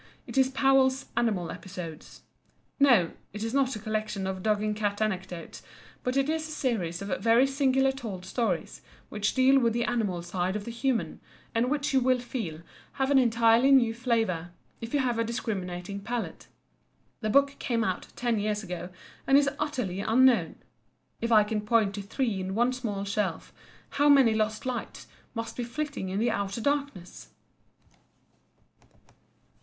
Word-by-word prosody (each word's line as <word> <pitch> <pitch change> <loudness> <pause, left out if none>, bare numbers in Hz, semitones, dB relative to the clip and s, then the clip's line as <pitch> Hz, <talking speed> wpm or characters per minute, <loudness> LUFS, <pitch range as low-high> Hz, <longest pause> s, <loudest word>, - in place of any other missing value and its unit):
It - - -9
is 265 -1 +4
Powell's 270 0 +3
"Animal 215 -8 0
Episodes." 175 -4 -9 0.6
No, 240 -12 +5 0.2
it 210 +1 -5
is 225 +1 -3
not 270 -2 +2
a - - -5
collection 215 -2 -3
of 190 0 -3
dog 210 +1 +1
and 210 0 -1
cat 205 -1 -1
anecdotes, 185 -5 -3 0.4
but 250 +2 -1
it 275 0 +2
is 315 0 -1
a - - -9
series 200 - -2
of 200 - -3
very 230 +3 +5
singularly 270 -1 +2
told 205 -8 -6
stories 185 -5 -2 0.3
which 210 -1 -1
deal 265 +1 +5
with 230 -3 +2
the 235 +1 0
animal 205 -8 -1
side 180 +2 -2
of 210 -1 -4
the 235 - -5
human, 240 +1 -1 0.3
and 230 +2 +1
which 285 -1 -1
you 265 - +5
will 255 0 +3
feel 225 -10 -5 0.3
have 270 0 0
an 275 - +6
entirely 230 +1 +4
new 250 -5 +5
flavour 225 -8 -1 0.3
if 230 0 -6
you 290 - +1
have 245 -3 0
a - - +3
discriminating 200 -4 -4
palate. 235 +3 -5 0.7
The 215 - -2
book 280 +4 +3
came 230 -2 0
out 185 -5 -2
ten 240 -3 0
years 210 0 -1
ago, 180 -1 -6 0.4
and 270 - +6
is 280 -1 +3
utterly 250 -11 -2
unknown. 245 +4 +3 0.7
If 230 +1 -1
I 215 -2 +7
can 210 0 -2
point 210 -2 +2
to 200 - -5
three 215 0 -2
in 190 +1 -4
one 240 +3 +2
small 215 -6 -3
shelf, 200 -4 -2 0.4
how 290 +1 +3
many 270 -6 +6
lost 215 +1 -1
lights 250 -3 -4 0.3
must 230 0 -4
be 245 - -3
flitting 275 -4 -4
in 190 - -3
the 230 +3 +2
outer 200 +1 -2
darkness! 280 -8 -3
230 Hz, 170 wpm, -28 LUFS, 200-260 Hz, 0.7 s, I